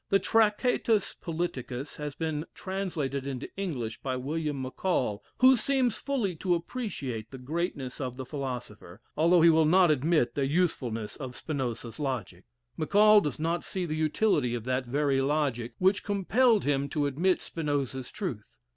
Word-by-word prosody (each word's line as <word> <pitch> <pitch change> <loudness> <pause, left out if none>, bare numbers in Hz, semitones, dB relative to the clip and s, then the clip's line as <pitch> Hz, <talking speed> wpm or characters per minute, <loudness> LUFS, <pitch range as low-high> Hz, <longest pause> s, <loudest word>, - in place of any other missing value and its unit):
The 195 - +5
"Tractatus 220 0 +2
Politicus" 145 -6 -4
has 150 -2 -5
been 160 -1 -2
translated 160 -8 -3
into 135 -1 -5
English 130 - -4
by 130 -1 -2
William 145 +2 -2
Maccall, 130 - -1 0.2
who 260 +1 +8
seems 255 -1 +1
fully 240 -11 -1
to 180 +1 +1
appreciate 150 - -4
the 130 - -9
greatness 140 -1 -3
of 125 -2 -3
the 130 0 -6
philosopher, 125 - -6 0.2
although 165 +2 +4
he 170 - +8
will 160 -1 +4
not 180 0 +5
admit 150 -3 +2
the 140 -2 0
usefulness 130 -9 -1
of 130 -4 -7
Spinoza's 125 -5 -4
logic. 130 -8 -4 0.3
Maccall 210 +5 +6
does 150 -7 -3
not 165 +2 -1
see 185 -2 -3
the 155 -2 -3
utility 155 - +1
of 115 - -4
that 130 +1 -1
very 140 +1 +1
logic 135 -5 0
which 190 +2 +2
compelled 210 +3 +3
him 140 -1 0
to 150 -1 0
admit 170 +7 +1
Spinoza's 140 -5 -2
truth. 110 - -6
150 Hz, 155 wpm, -29 LUFS, 130-180 Hz, 0.3 s, who